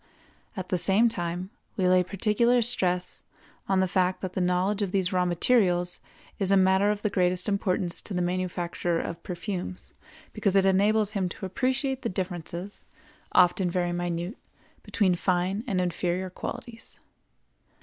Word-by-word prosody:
At 185 Hz, -1 st, -5 dB
the 180 Hz, -, 0 dB
same 205 Hz, +7 st, +4 dB
time 180 Hz, -2 st, -3 dB, 0.3 s
we 185 Hz, -2 st, +2 dB
lay 185 Hz, 0 st, +5 dB
particular 220 Hz, +6 st, +2 dB
stress 180 Hz, -6 st, 0 dB, 0.5 s
on 190 Hz, -1 st, +3 dB
the 190 Hz, -, +2 dB
fact 185 Hz, 0 st, +1 dB
that 185 Hz, -1 st, -4 dB
the 185 Hz, -, -1 dB
knowledge 180 Hz, +3 st, +1 dB
of 195 Hz, -3 st, -1 dB
these 190 Hz, -1 st, 0 dB
raw 180 Hz, -1 st, +2 dB
materials 180 Hz, -1 st, +2 dB, 0.4 s
is 195 Hz, -2 st, +3 dB
a 195 Hz, -, +5 dB
matter 190 Hz, +2 st, +4 dB
of 210 Hz, 0 st, -2 dB
the 210 Hz, -, +2 dB
greatest 180 Hz, -1 st, +1 dB
importance 190 Hz, -3 st, 0 dB
to 200 Hz, -, -6 dB
the 180 Hz, -, 0 dB
manufacturer 175 Hz, -1 st, -1 dB
of 170 Hz, 0 st, -5 dB
perfumes 180 Hz, 0 st, -5 dB, 0.4 s
because 200 Hz, -3 st, 0 dB
it 195 Hz, -1 st, +5 dB
enables 205 Hz, +2 st, +3 dB
him 195 Hz, -4 st, -1 dB
to 190 Hz, -, -7 dB
appreciate 260 Hz, +6 st, -1 dB
the 235 Hz, -, -2 dB
differences, 180 Hz, +1 st, -4 dB, 0.5 s
often 180 Hz, 0 st, +4 dB
very 175 Hz, 0 st, 0 dB
minute, 175 Hz, +3 st, -3 dB, 0.4 s
between 195 Hz, -4 st, +1 dB
fine 185 Hz, +4 st, 0 dB
and 195 Hz, -6 st, 0 dB
inferior 180 Hz, +1 st, -1 dB
qualities. 235 Hz, +3 st, -8 dB
185 Hz, 155 wpm, -27 LUFS, 180-205 Hz, 0.5 s, lay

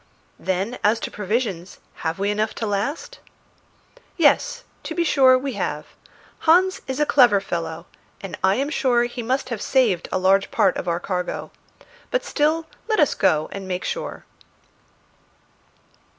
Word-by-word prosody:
"Then, 190 Hz, +6 st, -2 dB
as 215 Hz, +2 st, +3 dB
to -, -, -4 dB
provisions, 205 Hz, -4 st, -3 dB, 0.2 s
have 160 Hz, +1 st, -3 dB
we 200 Hz, +1 st, 0 dB
enough 215 Hz, +1 st, -1 dB
to 225 Hz, -, -3 dB
last?" 220 Hz, -, -3 dB, 1.0 s
"Yes; 485 Hz, +10 st, +3 dB, 0.2 s
to 325 Hz, -, -6 dB
be 345 Hz, -, +1 dB
sure 265 Hz, -5 st, +5 dB
we 270 Hz, 0 st, -4 dB
have. -, -, -3 dB, 0.5 s
Hans 370 Hz, +4 st, +3 dB
is 265 Hz, +1 st, -3 dB
a 300 Hz, -, +3 dB
clever 245 Hz, -8 st, +5 dB
fellow, 165 Hz, -3 st, -4 dB, 0.3 s
and 190 Hz, -5 st, -7 dB
I 190 Hz, +1 st, +4 dB
am 275 Hz, +5 st, -1 dB
sure 245 Hz, -6 st, +2 dB
he 240 Hz, 0 st, -4 dB
must 260 Hz, +3 st, -1 dB
have 230 Hz, -4 st, -4 dB
saved 225 Hz, -10 st, +1 dB
a -, -, +1 dB
large 190 Hz, +1 st, +3 dB
part 190 Hz, -, +2 dB
of -, -, -5 dB
our 170 Hz, 0 st, 0 dB
cargo. 180 Hz, -1 st, -4 dB, 0.6 s
But -, -, -1 dB
still 315 Hz, +2 st, +1 dB, 0.2 s
let 435 Hz, -3 st, +1 dB
us 300 Hz, -, +4 dB
go 155 Hz, -6 st, +2 dB
and 195 Hz, -1 st, -7 dB
make 180 Hz, -1 st, -3 dB
sure." -, -, -5 dB
225 Hz, 155 wpm, -22 LUFS, 190-285 Hz, 1.0 s, sure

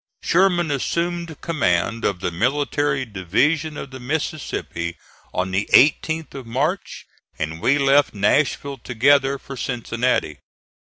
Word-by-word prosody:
Sherman 175 Hz, -3 st, +3 dB
assumed 170 Hz, +3 st, -2 dB
command 115 Hz, -, 0 dB
of 90 Hz, -3 st, -1 dB
the 90 Hz, -, -1 dB
military 140 Hz, -, 0 dB
division 140 Hz, -, 0 dB
of 135 Hz, -, -7 dB
the 130 Hz, -, -8 dB
Mississippi 125 Hz, -, -3 dB, 0.3 s
on 95 Hz, +1 st, -2 dB
the 100 Hz, +2 st, -1 dB
18th 160 Hz, +3 st, +4 dB
of 135 Hz, -4 st, -8 dB
March, 145 Hz, +11 st, -2 dB, 0.3 s
and 80 Hz, +2 st, -4 dB
we 135 Hz, +8 st, +3 dB
left 140 Hz, 0 st, +4 dB
Nashville 140 Hz, +5 st, +1 dB
together 135 Hz, +4 st, +3 dB
for 135 Hz, -, -9 dB
Cincinnati. 120 Hz, -, -1 dB
135 Hz, 120 wpm, -22 LUFS, 110-150 Hz, 0.3 s, 18th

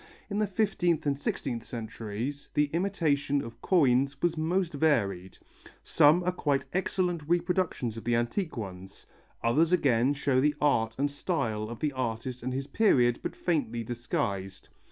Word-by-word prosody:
In 205 Hz, -, -1 dB
the 215 Hz, -, +2 dB
fifteenth 185 Hz, -6 st, 0 dB
and 140 Hz, -1 st, +1 dB
sixteenth 130 Hz, -4 st, -3 dB
centuries 115 Hz, +4 st, -5 dB
the 145 Hz, -1 st, +2 dB
imitation 160 Hz, -6 st, +1 dB
of 115 Hz, 0 st, -10 dB
coins 140 Hz, -5 st, +3 dB
was 175 Hz, -1 st, +1 dB
most 170 Hz, +2 st, 0 dB
varied; 100 Hz, -, 0 dB, 0.5 s
some 155 Hz, +5 st, +4 dB
are 180 Hz, -, +1 dB
quite 145 Hz, -6 st, 0 dB
excellent 180 Hz, -2 st, 0 dB
reproductions 175 Hz, -, 0 dB
of 115 Hz, -, -7 dB
the 120 Hz, 0 st, +1 dB
antique 130 Hz, -, -1 dB
ones, 95 Hz, -2 st, -8 dB, 0.4 s
others 155 Hz, +9 st, +3 dB
again 135 Hz, -5 st, +3 dB
show 135 Hz, -2 st, +1 dB
the 150 Hz, +1 st, +2 dB
art 115 Hz, -6 st, +2 dB
and 140 Hz, +1 st, 0 dB
style 120 Hz, -, -2 dB
of 120 Hz, -, -8 dB
the 150 Hz, -2 st, 0 dB
artist 125 Hz, 0 st, -3 dB
and 130 Hz, +2 st, -3 dB
his 135 Hz, +1 st, -3 dB
period 125 Hz, -, +3 dB
but -, -, -4 dB
faintly 120 Hz, -9 st, -1 dB
disguised. 100 Hz, -5 st, -3 dB
140 Hz, 155 wpm, -29 LUFS, 115-165 Hz, 0.5 s, some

